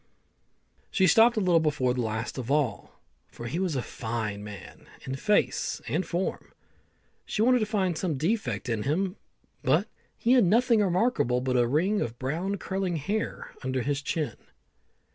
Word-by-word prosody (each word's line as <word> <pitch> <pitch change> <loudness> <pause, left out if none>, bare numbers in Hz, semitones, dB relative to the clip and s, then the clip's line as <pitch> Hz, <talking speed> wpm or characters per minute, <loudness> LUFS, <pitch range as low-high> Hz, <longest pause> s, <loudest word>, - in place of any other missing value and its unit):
She 190 - +3
stopped 225 +7 +6
a - - +4
little 180 -4 +4
before 140 -5 +1
the 125 - -1
last 110 +3 -3
of 125 -1 -5
all, 140 -7 -1 0.3
for 120 - -10
he 130 +9 -2
was 185 -5 0
a 125 - -1
fine 110 -3 -4
man 105 -3 -10 0.2
in 130 - -4
face 210 +9 +1
and - - 0
form. 180 +1 -3 0.7
She 215 - -1
wanted 250 +1 +5
to 215 - 0
find 190 -5 0
some 160 -4 -1
defect 155 - -1
in 115 -3 -1
him, 180 - -1 0.4
but - - +2 0.3
he 235 - +1
had 250 -3 +6
nothing 230 +4 +4
remarkable 185 - +2
but 130 0 -1
a 120 -1 +3
ring 180 - +1
of 120 0 -3
brown 170 +10 -2
curling 190 -2 -2
hair 200 +9 -3
under 130 -1 -1
his 145 +1 -1
chin. 155 0 -2
160 Hz, 165 wpm, -27 LUFS, 125-195 Hz, 0.7 s, stopped